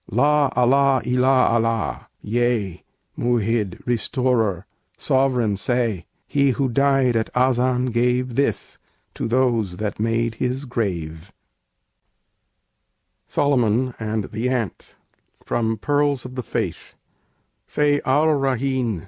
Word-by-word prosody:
"La 145 -2 +2
Allah 135 +2 +4
illa 130 +1 +3
Allah! 115 -1 -1 0.2
Yea, 115 -5 -1 0.3
Mu'hid! 115 -5 0
Restorer! 120 - 0 0.3
Sovereign!" 125 -6 +1
say! 115 -3 -1 0.2
He 140 -1 +2
who 135 -2 +1
died 135 -1 +2
at 110 -1 0
Azan 125 0 +2
gave 125 +1 0
This 140 +4 -1 0.3
to - - -3
those 115 -6 +1
that 105 -1 -4
made 115 +1 0
his 130 +2 -1
grave. 90 - -4 2.0
SOLOMON 125 -3 +1
AND 110 -1 -2
THE 115 +3 -2
ANT 120 -6 -3 0.5
From 115 -1 -1
'Pearls 145 +1 0
of 125 - -8
the 130 - -4
Faith' - - -4 0.7
_Say 145 -1 +1
Ar 150 +4 +3
Raheen! 130 -5 -1
125 Hz, 105 wpm, -22 LUFS, 110-130 Hz, 2.0 s, Allah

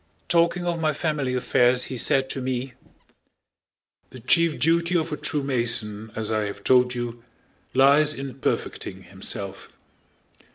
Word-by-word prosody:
Talking 170 +1 +2
of 170 -1 -1
my 155 -1 +2
family 145 -4 -1
affairs 125 0 +3
he 130 - -5
said 135 +3 +2
to 135 - -3
me, 130 0 -3 1.4
"the 130 - -11
chief 165 +6 +2
duty 170 +2 +2
of 160 0 -2
a - - -1
true 150 -1 -2
Mason, 115 -5 -1
as 110 -1 -3
I 110 -1 0
have 100 0 -8
told 125 0 +4
you, 120 -1 -5 0.5
lies 145 +3 +5
in 135 -3 -6
perfecting - - -3
himself. - - -6
130 Hz, 140 wpm, -24 LUFS, 120-155 Hz, 1.4 s, lies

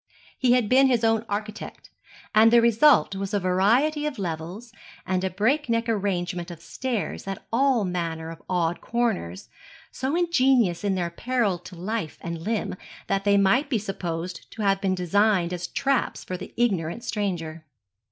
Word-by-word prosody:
He 250 -2 +4
had 250 -4 +2
been 265 +4 +5
his 245 -3 +1
own 225 -1 +2
architect, 210 +1 -6 0.4
and 220 +1 +6
the 235 - +7
result 235 -1 +4
was 195 +2 -3
a - - +2
variety 235 +12 +2
of 295 - -5
levels 180 +5 -5 0.3
and 185 0 -1
a 190 - 0
breakneck 230 - 0
arrangement 185 -5 -1
of 170 -2 -9
stairs 225 +5 -4
at 195 -1 -5
all 255 -3 +3
manner 165 -3 -3
of 165 - -11
odd 175 -2 0
corners, 220 - -2 0.4
so 265 +4 -2
ingenious 260 - +2
in 200 -2 +1
their 175 -2 -2
peril 230 -3 0
to 180 +1 -12
life 190 -1 -4
and 170 -1 -5
limb 210 -1 -2 0.3
that 195 0 -1
they 200 0 +4
might 200 +9 +3
be 245 - +1
supposed 180 -4 -5
to 220 - -5
have 195 -1 +2
been 190 -1 +1
designed 180 0 +2
as 175 0 -4
traps 275 -2 -1
for 185 - -5
the - - -8
ignorant 200 -3 0
stranger. 175 -8 -3
200 Hz, 165 wpm, -25 LUFS, 180-235 Hz, 0.4 s, the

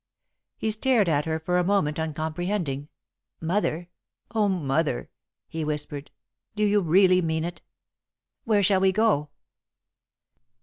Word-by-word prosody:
He 220 - -1
stared 220 -2 +2
at 150 -3 +1
her 160 0 -1
for 180 +3 0
a - - +2
moment, 175 -6 +1
uncomprehending. 160 -1 -2 0.5
"Mother! 175 0 -1 0.4
Oh, 215 -2 +2
Mother!" 155 -6 -1 0.4
he 160 -1 -4
whispered. 150 -1 -3 0.5
"Do 210 - 0
you 205 0 +3
really 185 +2 +4
mean 160 -1 -1
it? 175 +1 -5 0.8
Where 210 -3 +2
shall 190 0 +4
we 190 0 +4
go?" 190 -8 +2
175 Hz, 125 wpm, -26 LUFS, 155-200 Hz, 0.8 s, really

